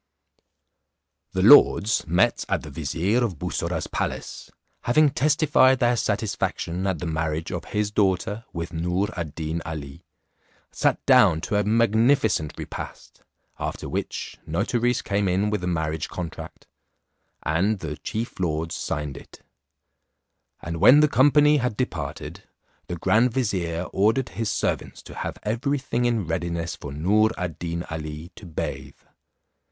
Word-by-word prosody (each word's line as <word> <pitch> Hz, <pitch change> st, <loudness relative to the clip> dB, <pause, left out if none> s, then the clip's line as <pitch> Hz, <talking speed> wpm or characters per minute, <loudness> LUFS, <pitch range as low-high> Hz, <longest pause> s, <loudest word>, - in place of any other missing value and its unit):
The 95 Hz, -, 0 dB
lords 110 Hz, -, +6 dB
met 85 Hz, +3 st, +2 dB
at -, -, 0 dB
the -, -, -9 dB
vizier 85 Hz, -, 0 dB
of 100 Hz, -9 st, -2 dB
Bussorah's -, -, -2 dB
palace, -, -, -4 dB, 0.4 s
having 145 Hz, +4 st, +4 dB
testified 145 Hz, -2 st, +4 dB
their 120 Hz, 0 st, +2 dB
satisfaction 100 Hz, -4 st, -2 dB
at 95 Hz, -3 st, 0 dB
the 90 Hz, -, -5 dB
marriage 80 Hz, 0 st, -2 dB
of -, -, -4 dB
his 105 Hz, 0 st, -1 dB
daughter 105 Hz, +2 st, 0 dB
with 85 Hz, 0 st, -5 dB
Noor 90 Hz, +5 st, -1 dB
ad 85 Hz, -5 st, -5 dB
Deen 80 Hz, +1 st, -3 dB
Ali, 80 Hz, 0 st, -7 dB, 0.7 s
sat -, -, 0 dB
down 80 Hz, -, +6 dB
to 105 Hz, -, -2 dB
a 105 Hz, -, +3 dB
magnificent 110 Hz, -, +2 dB
repast, -, -, -8 dB, 0.4 s
after -, -, -4 dB
which, -, -, -4 dB
notaries 120 Hz, +1 st, 0 dB
came 100 Hz, 0 st, 0 dB
in 95 Hz, +3 st, +1 dB
with 105 Hz, -3 st, -1 dB
the 90 Hz, -, -3 dB
marriage 80 Hz, -3 st, -2 dB
contrast, 85 Hz, -3 st, -7 dB, 0.8 s
and 95 Hz, +7 st, +1 dB
the 80 Hz, -5 st, -5 dB
chief 110 Hz, +9 st, -5 dB
lords 80 Hz, -2 st, -1 dB
signed 75 Hz, -2 st, -3 dB
it; -, -, -14 dB, 1.2 s
and 85 Hz, 0 st, -4 dB
when 140 Hz, -, +7 dB
the 150 Hz, -, +5 dB
company 145 Hz, +3 st, +5 dB
had 125 Hz, -5 st, -1 dB
departed, 130 Hz, -, -4 dB, 0.5 s
the 90 Hz, -, -4 dB
grand 105 Hz, +8 st, +3 dB
vizier 90 Hz, -9 st, -1 dB
ordered 110 Hz, +6 st, +2 dB
his 115 Hz, -2 st, -3 dB
servants -, -, -2 dB
to -, -, -11 dB
have -, -, -5 dB
every 130 Hz, +7 st, 0 dB
thing 125 Hz, -2 st, -1 dB
in 115 Hz, -5 st, +1 dB
readiness 85 Hz, +1 st, -2 dB
for 70 Hz, -, -8 dB
Noor 100 Hz, +9 st, +3 dB
ad 90 Hz, -4 st, -4 dB
Deen 85 Hz, 0 st, -3 dB
Ali, 80 Hz, +2 st, -6 dB
to 100 Hz, -, -11 dB
bathe. 80 Hz, -, -5 dB
95 Hz, 140 wpm, -24 LUFS, 80-115 Hz, 1.2 s, when